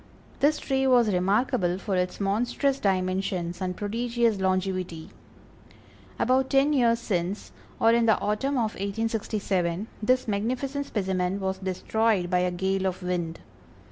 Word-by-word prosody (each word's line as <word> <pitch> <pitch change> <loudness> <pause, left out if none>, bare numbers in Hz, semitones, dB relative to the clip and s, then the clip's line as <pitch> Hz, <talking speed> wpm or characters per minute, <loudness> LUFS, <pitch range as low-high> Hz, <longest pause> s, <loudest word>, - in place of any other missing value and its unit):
This 300 +2 +3
tree 270 -1 0
was 240 -5 +4
remarkable 190 0 +1
for 195 0 -3
its 180 0 -1
monstrous 245 +7 0
dimensions 185 -2 -1
and 180 -1 -2
prodigious 230 0 0
longevity. 185 -3 -2 1.1
About 260 +1 +2
ten 275 +2 +3
years 235 -4 +3
since, 190 -3 -3 0.3
or 225 - +5
in 230 0 +3
the 220 - +5
autumn 240 +7 -1
of 220 -3 0
1867, 200 -3 -2 0.2
this 255 +3 +2
magnificent 255 +7 -2
specimen 190 -2 -1
was 190 -1 -2
destroyed 190 0 0
by 180 - +3
a 180 0 +1
gale 190 +2 -1
of 185 0 -4
wind. 175 -2 -3
200 Hz, 135 wpm, -26 LUFS, 185-235 Hz, 1.1 s, or